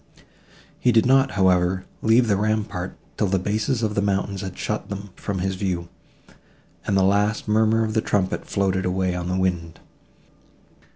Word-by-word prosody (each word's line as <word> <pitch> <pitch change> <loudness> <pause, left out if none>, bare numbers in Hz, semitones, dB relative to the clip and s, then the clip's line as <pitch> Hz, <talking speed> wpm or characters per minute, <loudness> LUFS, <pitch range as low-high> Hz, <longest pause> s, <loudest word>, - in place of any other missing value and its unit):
He 125 - +3
did 115 0 +4
not, 135 +1 +4
however, 95 -1 +2 0.2
leave 115 +2 +4
the 100 - +3
rampart, 105 -3 -2 0.2
till 105 - +1
the 95 +1 +1
bases 110 +6 -1
of 105 -1 0
the 100 - 0
mountains 100 -1 -1
had 95 -2 -6
shut - - -3
them 100 -1 -6
from 100 -2 -4
his 95 +1 -1
view, 90 -3 -3 1.0
and 100 - +2
the 95 - +4
last 105 +3 +1
murmur 110 +1 +3
of 110 -1 -2
the 110 - +2
trumpet 95 -3 -1
floated 95 -1 0
away 90 0 0
on 90 -1 -4
the 90 - 0
wind. 85 -3 -1
100 Hz, 170 wpm, -23 LUFS, 95-110 Hz, 1.0 s, did